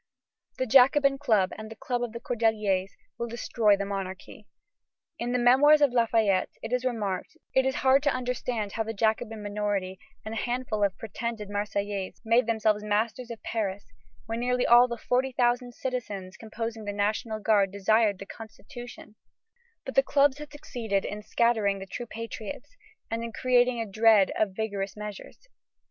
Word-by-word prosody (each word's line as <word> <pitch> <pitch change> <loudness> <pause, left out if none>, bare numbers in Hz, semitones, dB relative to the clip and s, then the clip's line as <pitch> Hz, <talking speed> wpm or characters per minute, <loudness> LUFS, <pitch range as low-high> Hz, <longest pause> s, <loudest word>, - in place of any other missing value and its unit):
The 260 - 0
Jacobin 275 +3 +5
Club 215 -9 +2
and 215 0 -7
the 225 - -9
Club 245 +2 -3
of 240 -2 -2
the 235 - -7
Cordeliers 215 -6 0 0.3
will 235 - -2
destroy 225 -3 +2
the 200 - -2
monarchy. 195 +1 -6 0.7
In 240 +1 -2
the 250 - +1
Memoirs 265 +5 +6
of 285 -4 +3
Lafayette 225 -5 +2
it 225 +2 -4
is 250 0 +1
remarked 220 0 -2 0.2
that - - +4
"it 260 - +2
is 265 - -1
hard 265 +1 +6
to 290 - +2
understand 245 -4 -2
how 225 - -3
the 225 0 -3
Jacobin 220 0 0
minority 205 -2 -2 0.3
and 220 - -5
a - - -4
handful 245 -4 -1
of 200 -2 +1
pretended 225 -1 -5
Marseillais 205 -1 -3
made 230 +1 +3
themselves 215 -2 +1
masters 220 +4 -1
of 230 -2 -8
Paris 205 -3 -3 0.4
when 225 +1 -3
nearly 250 +1 +1
all 240 +1 +7
the 235 -1 -5
forty 255 +3 0
thousand 245 0 +1
citizens 205 -8 -5
composing 225 0 -6
the 205 - -3
National 215 +2 -1
Guard 205 -3 +3
desired 205 +1 +2
the 195 - -8
Constitution; 225 +1 -11 0.7
but 265 - -5
the 270 - +6
clubs 280 0 +2
had 300 0 -9
succeeded 230 -9 -3
in 210 +1 -5
scattering 215 -3 +1
the 195 - -7
true 240 +5 -6
patriots 230 - -7 0.4
and 230 0 -2
in 230 - -5
creating 245 0 +2
a 225 - -1
dread 215 -1 +4
of 200 -3 0
vigorous 200 -2 -3
measures. 210 - -9
225 Hz, 170 wpm, -27 LUFS, 205-245 Hz, 0.7 s, all